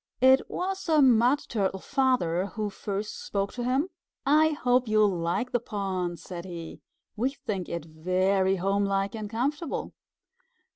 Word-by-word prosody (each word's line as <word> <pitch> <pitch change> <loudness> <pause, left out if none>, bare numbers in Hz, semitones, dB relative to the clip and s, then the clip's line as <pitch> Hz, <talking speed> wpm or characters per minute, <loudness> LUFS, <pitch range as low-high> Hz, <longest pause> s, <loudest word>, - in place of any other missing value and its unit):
It 260 +1 +7
was 380 0 -3
a 310 -1 +5
Mud 255 +1 +5
Turtle 195 -4 -1
Father 245 - +1
who 210 0 -4
first 205 +1 -5
spoke 200 0 -2
to 245 - -4
him. 265 +8 +1 0.4
"I 305 +3 +5
hope 250 -4 +1
you'll 215 -3 +3
like 170 +9 -1
the 245 - +2
pond," 190 -6 -3
said 175 -1 -8
he. 170 -3 -8 0.3
"We 250 +5 0
think 195 -9 -4
it 170 -2 -4
very 185 +4 +1
homelike 195 +1 0
and 215 -2 -5
comfortable." 280 +9 -2
210 Hz, 145 wpm, -27 LUFS, 190-255 Hz, 0.4 s, It